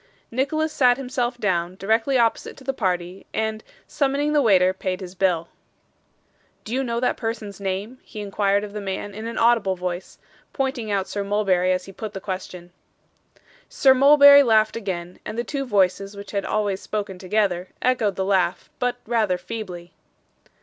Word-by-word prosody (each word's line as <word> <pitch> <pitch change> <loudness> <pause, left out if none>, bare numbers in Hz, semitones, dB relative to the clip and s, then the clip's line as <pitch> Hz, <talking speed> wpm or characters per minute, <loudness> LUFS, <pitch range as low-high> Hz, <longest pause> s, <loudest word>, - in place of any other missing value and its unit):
Nicholas 310 +5 0
sat 250 -5 +4
himself 250 -2 -2
down, 180 -5 -1
directly 225 +7 +1
opposite 230 -2 0
to 270 - -13
the 270 +1 -2
party, 180 -4 -2
and, 220 0 -2 0.2
summoning 285 +1 0
the 295 - +4
waiter, 185 -6 +4
paid 185 -1 -3
his 185 -2 -8
bill. 180 -3 0 1.1
'Do 220 - -6
you 265 +1 +1
know 235 -2 -2
that 250 - 0
person's 225 -3 -5
name?' 200 +6 -4
he 215 - -10
inquired 200 0 0
of 205 -1 -7
the 210 - -5
man 195 +1 -4
in 220 +3 -6
an 230 - -5
audible 230 -5 +3
voice; 180 0 -5 0.4
pointing 265 -5 -2
out 195 -2 0
Sir 205 - -3
Mulberry 195 -3 +1
as 185 0 -1
he 195 - -10
put 210 +2 -7
the 195 - -5
question. 185 -2 -6 1.0
Sir 265 -1 +5
Mulberry 285 +1 +8
laughed 220 -4 +3
again, 180 -5 -5
and 220 - -6
the 235 - 0
two 275 0 -4
voices 195 -1 +1
which 200 0 -9
had 200 -1 -2
always 205 -3 -1
spoken 200 -3 -4
together, 185 -2 0
echoed 230 -6 +1
the 190 - -1
laugh; 185 -2 0
but 245 -1 0
rather 215 -5 +1
feebly. 180 -5 -7
205 Hz, 170 wpm, -23 LUFS, 190-240 Hz, 1.1 s, Mulberry